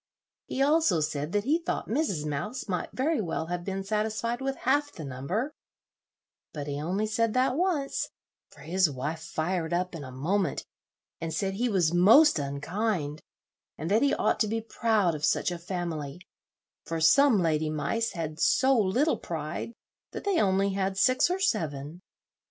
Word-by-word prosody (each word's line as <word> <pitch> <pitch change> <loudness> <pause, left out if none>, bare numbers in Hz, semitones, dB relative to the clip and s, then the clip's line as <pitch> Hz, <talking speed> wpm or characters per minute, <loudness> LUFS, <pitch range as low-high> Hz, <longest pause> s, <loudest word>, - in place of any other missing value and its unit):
He 270 - 0
also 295 - +3
said 150 0 -2
that 205 -1 +1
he 300 +8 +2
thought 335 - -3
Mrs. 220 - -1
Mouse 180 - -4
might 180 -3 -2
very 295 +1 0
well 165 -3 -2
have 175 0 -3
been 195 +1 -3
satisfied 220 +4 -1
with 270 0 -1
half 290 +3 +1
the 160 - -8
number; 140 - -3 1.0
but 145 -2 -5
he 145 0 -4
only 190 +7 -1
said 225 +1 0
that 255 0 +2
once, 320 -5 0 0.4
for - - -17
his 180 +1 +2
wife 150 +4 -4
fired 165 +1 -2
up 180 +1 -1
in 160 -4 -6
a 130 - -8
moment, 165 +6 -1 0.5
and 165 0 -4
said 195 +3 -1
he 240 +5 0
was 175 -6 +2
most 215 - +6
unkind, 150 +3 -2 0.6
and 160 +5 -4
that 220 +3 +4
he 285 - +3
ought - - +1
to 215 - +2
be 225 +2 -1
proud 220 -5 +1
of 150 -1 -6
such 180 - +2
a 175 - -5
family, 170 -4 -4 0.6
for 165 0 -3
some 230 - +5
lady 155 -3 +1
mice 155 +10 -1
had 160 -2 -5
so 265 +8 +4
little 240 +8 +2
pride 160 +5 -5 0.4
that - - -6
they 400 -4 +2
only 195 0 +2
had 195 0 -1
six 255 - +4
or 365 - 0
seven. 160 - -2
190 Hz, 170 wpm, -28 LUFS, 160-230 Hz, 1.0 s, most